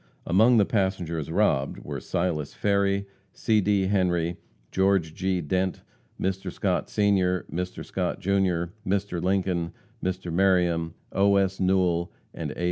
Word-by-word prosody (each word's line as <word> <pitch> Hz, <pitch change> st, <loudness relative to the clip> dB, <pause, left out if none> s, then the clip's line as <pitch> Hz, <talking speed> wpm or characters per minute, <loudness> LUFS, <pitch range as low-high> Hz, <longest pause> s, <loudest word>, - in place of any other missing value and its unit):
Among 110 Hz, +8 st, +5 dB
the 105 Hz, -, +5 dB
passengers 90 Hz, -7 st, -1 dB
robbed, 70 Hz, 0 st, +1 dB
were -, -, -5 dB
Silas 80 Hz, -5 st, -2 dB
Ferry, 100 Hz, -1 st, +1 dB, 0.3 s
C. 110 Hz, -2 st, +2 dB
D. 100 Hz, 0 st, +2 dB
Henry, 90 Hz, -3 st, +1 dB, 0.3 s
Geo. 95 Hz, +1 st, +3 dB
G. 90 Hz, +2 st, -2 dB
Dent, 95 Hz, +4 st, -1 dB, 0.4 s
Mr. 95 Hz, -1 st, -2 dB
Scott, -, -, -1 dB
Sr., 95 Hz, -4 st, +2 dB
Mr. 90 Hz, +2 st, -4 dB
Scott, 90 Hz, -1 st, -2 dB
Jr., 95 Hz, -3 st, 0 dB
Mr. 100 Hz, -3 st, -1 dB
Lincoln, 90 Hz, -2 st, 0 dB, 0.3 s
Mr. 95 Hz, -2 st, -3 dB
Meriam, 85 Hz, -3 st, +2 dB, 0.2 s
O. 100 Hz, 0 st, +3 dB
S. 95 Hz, -1 st, +1 dB
Newell 90 Hz, -2 st, +2 dB, 0.2 s
and -, -, -4 dB
A. -, -, -8 dB
95 Hz, 130 wpm, -26 LUFS, 85-100 Hz, 0.4 s, Among